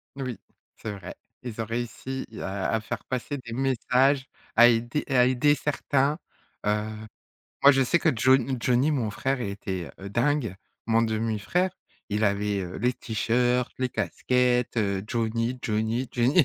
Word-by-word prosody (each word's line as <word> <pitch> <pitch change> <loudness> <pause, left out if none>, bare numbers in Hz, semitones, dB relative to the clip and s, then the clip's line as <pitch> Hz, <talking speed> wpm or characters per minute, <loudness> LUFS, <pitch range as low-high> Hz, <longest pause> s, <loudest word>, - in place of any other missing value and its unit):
Oui, 130 -4 -4 0.4
c'est 110 - -6
vrai. 100 -2 -8 0.3
Ils 120 -3 -7
ont - - -2
réussi 120 +3 -4 0.2
à 95 0 -2
à 110 - +1
faire 110 - -5
passer 130 +3 -3
des 115 -3 -8
messages, 130 +1 +2 0.3
à 120 +1 +9
aider 120 +4 +1
à 125 -2 +5
aider 130 +4 +3
certains. 145 +1 0 0.5
Heu, 105 0 +1 0.8
moi 140 - +10
je 135 - +3
sais 150 - +3
que 170 - +3
John 130 +2 +3
Johnny, 125 +5 +2
mon 125 -7 0
frère 135 +5 -1
était, 100 -4 -4
heu, 100 - -7
dingue! 120 -2 +1 0.3
Mon 115 0 +3
demi-frère. 115 - 0 0.4
Il 105 +1 +1
avait, 100 0 +1
heu, 90 -1 -6
les 125 +3 +1
t-shirts, 120 +3 0
les 130 -1 0
casquettes, 125 -1 +1
heu, 100 -3 0
Johnny, 115 +2 -1
Johnny, 110 +4 -1
Johnny. 130 +8 +4
120 Hz, 155 wpm, -26 LUFS, 110-130 Hz, 0.8 s, moi